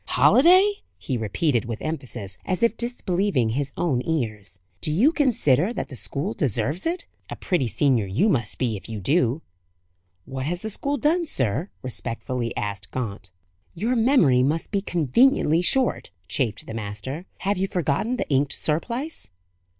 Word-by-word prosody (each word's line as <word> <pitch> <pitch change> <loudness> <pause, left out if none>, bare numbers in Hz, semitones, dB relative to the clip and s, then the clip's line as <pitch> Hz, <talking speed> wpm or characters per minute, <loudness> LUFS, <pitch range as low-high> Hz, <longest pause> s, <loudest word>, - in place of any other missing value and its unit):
"Holiday!" 370 +8 +5 0.2
he 130 - -3
repeated, 120 - 0
with 115 -1 -4
emphasis, 125 -10 -5
as 185 +4 -1
if 235 - +3
disbelieving 195 - 0
his 140 +4 -1
own 140 -8 +1
ears. 110 - -3 0.2
"Do 155 - +1
you 225 - +4
consider 215 - +2
that - - -4
the 130 - -8
school 150 - -3
deserves 140 - -1
it? 340 0 -2 0.2
A - - -5
pretty 175 - 0
senior 120 -3 +2
you 110 - +2
must 115 - 0
be, 120 -4 0
if 100 - -9
you 110 -2 -4
do." 135 - +1 0.8
"What 130 0 -4
has 175 +3 -2
the 220 - -2
school 280 +7 -1
done, 325 +6 +1
sir?" 130 - 0
respectfully 120 -1 -3
asked 100 -1 -3
Gaunt. 100 -6 -5 0.5
"Your 225 +9 0
memory 220 - +4
must 150 +5 0
be 200 -2 +1
conveniently 175 - +3
short," 255 +8 +1 0.2
chafed 110 +3 -1
the - - -7
master. 115 - -5
"Have 200 0 0
you 195 - +1
forgotten 180 - 0
the - - -2
inked 140 0 +1
surplice?" 235 - -3
150 Hz, 160 wpm, -24 LUFS, -, 0.8 s, Holiday